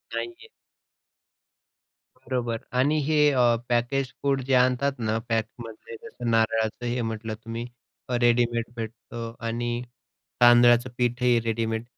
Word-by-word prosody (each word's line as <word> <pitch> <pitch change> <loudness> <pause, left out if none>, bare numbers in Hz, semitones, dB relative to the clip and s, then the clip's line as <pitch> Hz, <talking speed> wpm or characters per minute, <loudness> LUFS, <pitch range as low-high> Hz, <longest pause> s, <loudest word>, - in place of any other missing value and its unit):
नाही - - -2
आहे. 355 +6 -16 1.7
बरोबर 120 -3 -3 0.2
आणि 145 +4 +3
हे 155 +1 +1
अ, 120 -3 +3
पॅकेज 125 +2 0
फूड 140 -1 +1
जे 135 +1 -1
आणतात 125 +2 +3
ना 110 0 0
पॅकमधले. 115 0 -4
जसं 120 -2 -5
नारळाचं 115 +1 +1
हे 120 +1 -1
म्हटलं 110 -1 -4
तुम्ही 115 +1 -5 0.6
रेडीमेड 120 -1 +3
भेटतं 115 0 -7
आणि 120 +1 -2 0.6
तांदळाचं 120 0 +6
पीठही 120 0 +2
रेडीमेड. 115 0 -1
120 Hz, 115 wpm, -25 LUFS, 115-125 Hz, 1.7 s, तांदळाचं